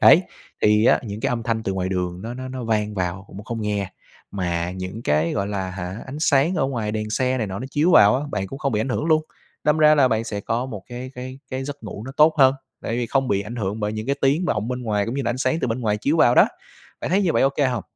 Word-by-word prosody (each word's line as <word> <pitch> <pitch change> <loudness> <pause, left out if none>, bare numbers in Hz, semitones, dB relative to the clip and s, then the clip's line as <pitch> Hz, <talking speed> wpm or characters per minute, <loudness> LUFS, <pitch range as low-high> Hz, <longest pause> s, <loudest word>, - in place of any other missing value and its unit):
Đấy, - - +8 0.4
thì 105 +1 +4
á - - +5
những 105 -1 -6
cái - - 0
âm 120 -2 -1
thanh 115 -1 -1
từ 95 - -2
ngoài 95 -1 -2
đường 90 0 -3
nó 115 +2 -5
nó 130 0 -6
nó 130 -2 -5
vang 105 -2 0
vào 90 0 -3
cũng 100 +1 -10
không 115 -1 -4
nghe, 100 -2 -2 0.4
mà 90 -2 -2
những 95 +4 -6
cái, 75 +3 +1
gọi 100 -2 -1
là, 95 -2 -3
hả 90 +2 -6
ánh 135 +3 -7
sáng 150 +4 +3
ở 135 - +1
ngoài 115 -5 -2
đèn 110 0 -3
xe 130 +2 +1
này 110 - -1
nọ 95 +1 -5
nó 130 - -5
chiếu 155 +5 +2
vào 115 -4 +7
á, 140 - -2
bạn 95 +1 -2
cũng 135 - -8
không 135 -5 -1
bị 105 - +1
ảnh 120 - -1
hưởng 130 - -1
luôn. 155 -1 +3 0.4
Đâm 150 +1 +3
ra 155 0 +7
là 140 -4 +4
bạn 110 0 0
sẽ 105 -2 -4
có 120 +5 -2
một 105 -7 -7
cái 125 +1 -7
cái 130 +1 -7
cái 130 0 -3
giấc 145 -1 -7
ngủ 105 -1 -7
nó 135 - -7
tốt 155 +1 +6
hơn, 135 -1 +6 0.3
tại - - -3
vì 120 -1 -1
không 135 +2 0
bị 100 0 +1
ảnh 115 +4 -7
hưởng 105 0 -3
bởi 105 0 -1
những 110 +1 -5
cái 140 - +1
tiếng 145 +7 +2
vọng 110 - -1
bên 125 0 -3
ngoài 105 -3 0
cũng 115 - -3
như 140 - -1
là 120 - 0
ánh 125 - -3
sáng 160 +4 +1
từ 125 - 0
bên 115 +3 -2
ngoài 105 -2 +1
chiếu 145 +9 0
vào 120 -5 +5
đó. - - +6 0.5
Bạn - - -3
thấy 195 +2 +3
như 175 - +2
vậy - - +2
OK 135 +1 +2
hông? 120 -5 -2
115 Hz, 295 wpm, -23 LUFS, 100-130 Hz, 0.5 s, Đấy